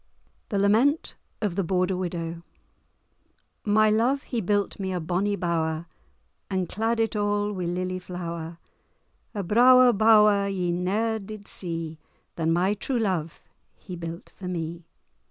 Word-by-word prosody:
*THE 205 - -1
LAMENT 225 +10 +2 0.3
OF 200 -5 0
THE 195 - +1
BORDER 185 +1 +1
WIDOW* 170 -2 -4 1.2
My 215 +1 +4
love 245 +6 +2
he 235 -3 -3
built 205 +1 0
me 190 -1 -2
a 180 - -1
bonny 185 +5 0
bower, 165 -3 -1 0.6
And 185 -2 -1
clad 225 +5 -1
it 225 0 +1
a' 210 - -1
wi' 205 -2 0
lilye 185 +1 -2
flower, 170 -2 -6 0.8
A 200 - -2
brawer 250 +5 +6
bower 210 -2 +5
ye 185 -3 -1
ne'er 210 +6 0
did 205 0 -9
see, 165 -3 -4 0.4
Than 165 -1 0
my 180 +4 +2
true 245 +5 -2
love 185 -8 -2 0.3
he 185 - -9
built 170 0 -7
for 185 - -7
me. 170 -1 -4
190 Hz, 140 wpm, -26 LUFS, 170-210 Hz, 1.2 s, brawer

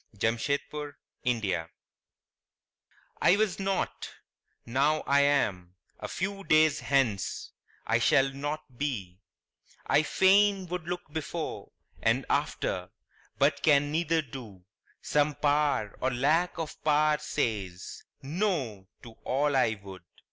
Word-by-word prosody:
THE 110 +3 +2
MYSTERY 125 - -3 1.6
I 180 - +6
was 210 -3 0
not; 195 0 -2 0.6
now 140 +6 +2
I 140 0 +4
am 100 -11 +1 0.2
a - - -5
few 195 +2 -3
days 155 -3 +4
hence 125 -8 0 0.3
I - - +2
shall 135 0 +4
not 145 -2 -5
be; 100 -11 -3 0.7
I 150 - +4
fain 195 +3 +4
would 180 -2 -4
look 175 -4 -5
before 160 +1 -5 0.3
And - - +2
after, - - -1 0.5
but - - +2
can 145 -1 +4
neither 165 0 +1
do; 115 -9 -10 0.4
some 150 0 +1
Power 145 -7 +1
Or 130 - +2
lack 155 +8 +1
of 160 -2 -6
power 150 0 +3
says 105 -12 -3 0.2
"no" 140 - -2 0.2
to 115 - -10
all 140 +2 +1
I 110 -5 +2
would. 95 -2 -10
145 Hz, 115 wpm, -29 LUFS, 120-155 Hz, 1.6 s, I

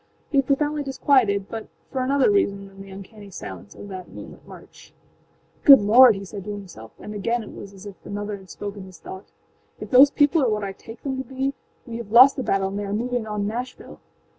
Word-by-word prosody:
He 280 - 0
was 275 - -1
profoundly 295 +1 0
disquieted, 260 -7 +1
but 225 -1 -7 0.2
for 260 - -2
another 275 +7 +2
reason 200 - 0
than 195 0 -14
the 195 - -12
uncanny 200 +2 -12
silence 100 - -10
of - - -10
that 185 -2 -8
moonlight - - -12
march. - - -15 0.7
âGood 270 -7 +8
Lord!â 235 +2 +7
he 195 - -8
said 195 0 -8
to - - -7
himselfâand 195 - -9
again 230 +3 -2
it - - -11
was 200 - -10
as 195 0 -14
if 200 -2 -12
another 205 0 -5
had 190 -1 -17
spoken 200 -1 -7
his 185 -3 -14
thoughtââif 190 +3 -11 0.6
those 270 +2 +8
people 290 +3 +2
are 255 - +2
what 210 -1 -2
I 195 - -4
take 225 +4 -13
them 265 -2 -3
to - - -3
be 265 +2 -3 0.3
we 230 -2 -7
have 230 -3 -9
lost 255 +4 +8
the 265 - -3
battle 195 -4 0
and 200 +1 -5
they 205 - -4
are 200 - -4
moving 240 +1 -2
on 210 -1 -3
Nashville! 245 +4 -6
210 Hz, 215 wpm, -23 LUFS, 195-260 Hz, 0.7 s, âGood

